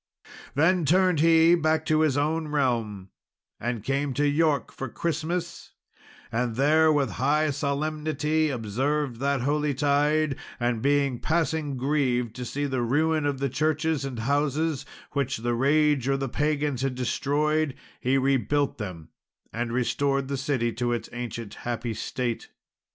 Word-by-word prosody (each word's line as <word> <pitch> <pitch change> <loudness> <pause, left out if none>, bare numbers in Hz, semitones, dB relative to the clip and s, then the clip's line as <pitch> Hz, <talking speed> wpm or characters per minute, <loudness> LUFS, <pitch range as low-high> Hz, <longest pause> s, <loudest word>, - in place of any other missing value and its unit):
Then 170 +5 +3
turned 180 +1 +3
he 165 +1 +6
back 160 -2 +2
to 155 -1 +2
his 155 -3 +2
own 155 +2 0
realm, 115 -10 -1 0.5
and 120 -2 -3
came 135 +1 -1
to 145 +1 +2
York 150 0 +1
for 135 - -6
Christmas, 170 +4 -3 0.6
and 115 0 -1
there 155 +4 +4
with 140 -5 +1
high 150 +3 +2
solemnity 150 +2 -1
observed 130 +3 -1
that 140 -1 0
holy 145 +1 0
tide; 145 +1 +2 0.2
and 120 -2 0
being 140 -2 +1
passing 160 -3 -1
grieved 125 -4 0
to 125 - -4
see 145 +5 -2
the 130 -3 -1
ruin 155 +5 +1
of 140 -2 -1
the 140 +1 -1
churches 155 +2 0
and 135 -3 -5
houses, 145 +4 0 0.2
which 140 -2 -1
the 120 +2 -1
rage 140 +1 +2
or 135 0 +2
the 135 0 -2
pagans 145 0 -1
had 135 -1 -1
destroyed, 145 +4 0 0.2
he 130 +2 +1
rebuilt 135 +1 +1
them, 90 -7 -6 0.4
and 120 0 -2
restored 135 +2 0
the 140 - -1
city 130 -4 0
to 120 +1 -2
its 120 - -3
ancient 115 -3 -5
happy 120 -1 -3
state. 120 +2 -3
140 Hz, 145 wpm, -26 LUFS, 125-155 Hz, 0.6 s, he